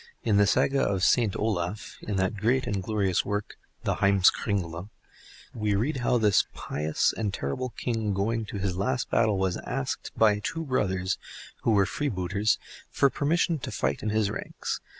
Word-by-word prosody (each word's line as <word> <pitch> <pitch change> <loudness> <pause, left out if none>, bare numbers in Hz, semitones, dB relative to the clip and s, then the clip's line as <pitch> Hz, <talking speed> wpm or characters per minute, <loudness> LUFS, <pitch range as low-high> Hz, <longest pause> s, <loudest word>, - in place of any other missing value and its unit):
In 105 -2 +3
the 100 0 +5
Saga 135 +6 +2
of 95 -7 0
Saint 115 -2 +3
Olaf 100 -2 -2
(in 105 - -3
that 95 +2 0
great 120 +6 +1
and 100 -2 -1
glorious 100 -2 0
work 105 0 -3 0.3
"The - - 0
Heims 100 -1 +5
kringla") 90 -2 -3 0.6
we 105 -2 0
read 130 +8 0
how 125 -1 +2
this 105 -4 +3
pious 75 +1 0
and 105 -3 -1
terrible 100 - -3
king 115 -4 -1
going 110 +3 0
to 105 - -6
his 95 -2 -1
last 125 +6 -1
battle 105 -2 +3
was 95 -1 0
asked 70 - -3
by 105 -2 +4
two 165 - -3
brothers, 95 -8 0 0.4
who 115 - +2
were 100 -2 +4
freebooters, 100 - 0 0.3
for 140 - +3
permission 165 +2 +1
to - - -5
fight 70 +1 -1
in 110 - -1
his 105 -1 +1
ranks. - - -4
105 Hz, 170 wpm, -27 LUFS, 95-115 Hz, 0.6 s, the